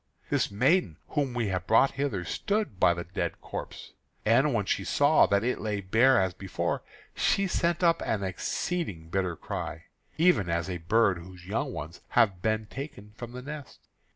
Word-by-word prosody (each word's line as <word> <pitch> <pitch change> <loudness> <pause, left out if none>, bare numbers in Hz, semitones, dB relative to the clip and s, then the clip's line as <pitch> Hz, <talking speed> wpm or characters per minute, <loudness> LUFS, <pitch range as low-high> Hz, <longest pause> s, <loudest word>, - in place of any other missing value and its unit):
this - - +2
maiden 125 - +2
whom 145 -4 0
we 115 -4 0
have 90 -1 -2
brought 115 +5 +5
hither 135 -10 -2
stood 205 - -2
by 85 - +6
the 85 0 -3
dead 90 +1 -3
corpse. - - -7 0.3
And 130 +7 +4
when 110 -5 0
she - - 0
saw - - +4
that 100 +1 +2
it 125 +2 -1
lay 105 -2 -1
bare 110 +6 +4
as 95 -2 +1
before, 95 -1 -2 0.3
she 195 - +2
sent 175 -1 0
up 165 -1 +4
an 105 -3 -1
exceeding 95 - -3
bitter 90 -1 -1
cry, - - -5 0.3
even 155 - +3
as 85 +2 -1
a 90 - -2
bird 100 +2 +2
whose 90 +1 -12
young 120 +9 -2
ones 80 -2 -7 0.2
have 100 -7 +4
been 110 +1 0
taken 105 -4 -8
from 120 +1 -8
the 125 0 -7
nest. 145 -1 -8
105 Hz, 180 wpm, -28 LUFS, 95-135 Hz, 0.3 s, by